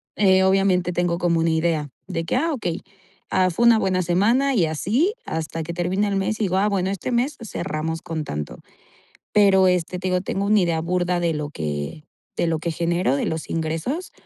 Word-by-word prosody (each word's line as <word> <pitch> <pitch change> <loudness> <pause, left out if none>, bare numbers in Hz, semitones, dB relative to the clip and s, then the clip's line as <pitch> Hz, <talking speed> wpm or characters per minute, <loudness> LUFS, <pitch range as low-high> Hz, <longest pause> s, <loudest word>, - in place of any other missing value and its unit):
eh, 190 -2 +4
obviamente 190 -2 +2
tengo 175 -1 0
como 170 -2 +1
una 165 0 +2
idea 160 -2 0 0.2
de 165 -3 -3
que: 165 - -1
"Ah, 325 +4 +1
okey, 175 -9 -3 0.5
ah, 185 0 +2
fue 235 +8 +1
una 230 -2 +6
buena 185 -2 +1
semana". 230 +11 +2
Y 175 -6 +3
así 225 - 0
hasta 160 0 -4
que 170 +2 -5
termine 185 +4 0
el 200 - -1
mes, 205 +3 -1
y - - 0
digo: 190 -1 +1
"Ah, 205 +2 +3
bueno, 190 -2 0
este 200 +6 -3
mes 255 +5 0
cerramos 160 -5 -4
con 160 -2 -4
tanto". 75 - -5 0.7
Pero 195 -2 +5
este 180 0 0
te 185 +1 -3
digo, 180 0 +1
tengo 195 +1 -2
una 210 -1 +4
idea 170 -2 +1
burda 175 +1 0
de 170 -1 +1
lo 150 -1 -4
que 75 - -4 0.3
de - - +1
lo 160 -1 0
que 170 +1 -3
genero 170 -3 0
de - - -1
los 160 -1 -3
ingresos, 165 - -3
180 Hz, 205 wpm, -22 LUFS, 165-195 Hz, 0.7 s, una